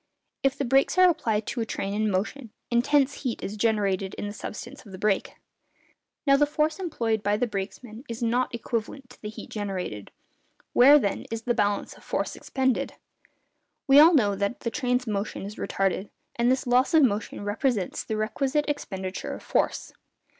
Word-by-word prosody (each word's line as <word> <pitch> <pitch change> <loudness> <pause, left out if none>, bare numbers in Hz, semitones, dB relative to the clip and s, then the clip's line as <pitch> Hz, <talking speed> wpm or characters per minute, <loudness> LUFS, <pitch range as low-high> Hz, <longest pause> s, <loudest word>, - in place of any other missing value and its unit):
If 270 0 +1
the 280 - -1
brakes 270 +7 +3
are 370 0 +8
applied 225 -11 0
to 240 - -3
a - - -1
train 195 -1 -3
in 215 +1 +1
motion, 215 +6 -2 0.2
intense 275 +3 +2
heat 250 -5 -3
is 200 - -4
generated 200 -3 0
in - - -5
the 205 - -5
substance 210 - -8
of 200 - -14
the 185 - -8
brake. 200 0 0 0.9
Now, 275 -1 +6
the 295 +1 +3
force 305 +2 0
employed 230 - -1
by 205 0 +1
the 245 - +1
brakesman 215 +3 -6
is 230 +1 -4
not 245 +2 +1
equivalent 235 +3 -4
to - - -17
the 210 - -5
heat 215 - -10
generated. 190 - -4 0.6
Where, 280 +4 +8
then, 205 -9 -1
is 225 0 -4
the 240 - +1
balance 205 -2 0
of - - -18
force - - -2
expended? 260 -1 -1 0.9
We 275 +1 +7
all 325 +3 +8
know 210 -8 +3
that 200 +4 -2
the 230 - -2
train's 250 -2 0
motion 210 -3 -3
is 205 +2 -7
retarded, 195 +1 -1 0.3
and 240 +1 +2
this 260 +2 0
loss 255 +6 +3
of 315 - +7
motion 210 -3 0
represents 205 -1 -1
the 220 - -3
requisite 275 +7 0
expenditure 190 -10 -4
of - - -11
force. - - -1
230 Hz, 180 wpm, -26 LUFS, 205-270 Hz, 0.9 s, are